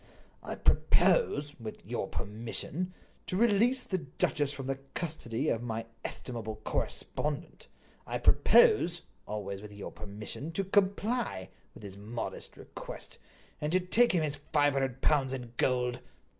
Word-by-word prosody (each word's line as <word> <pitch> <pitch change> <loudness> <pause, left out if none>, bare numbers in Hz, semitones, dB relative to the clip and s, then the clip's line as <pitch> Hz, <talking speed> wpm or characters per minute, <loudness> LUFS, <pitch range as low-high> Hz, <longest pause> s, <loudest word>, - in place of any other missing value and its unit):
"I - - -5
propose, 145 - +3
with 110 -2 -7
your - - -2
permission, 120 - -4 0.3
to 185 - -1
release 235 +4 +4
the 185 - -1
duchess 145 -1 0
from 140 -2 -6
the 135 0 -1 0.2
custody 150 -5 -2
of 115 - +1
my 115 -1 -3 0.2
estimable 115 -3 -4
correspondent. 150 +2 -2 0.4
I - - -1
propose—always 135 - +3
with 105 0 -9
your 100 - -7
permission—to 110 - -4
comply 200 - +1 0.3
with - - -12
his 100 -1 -8
modest 110 +3 -5
request, - - -8 0.4
and 150 +1 0
to 185 - +4
take 220 +6 +4
him 170 -3 +3
his 145 -1 -1
five 145 -2 +4
hundred 135 -1 -1
pounds 135 -3 +3
in 120 -3 -6
gold." 125 -1 +1
140 Hz, 130 wpm, -31 LUFS, 115-180 Hz, 0.4 s, release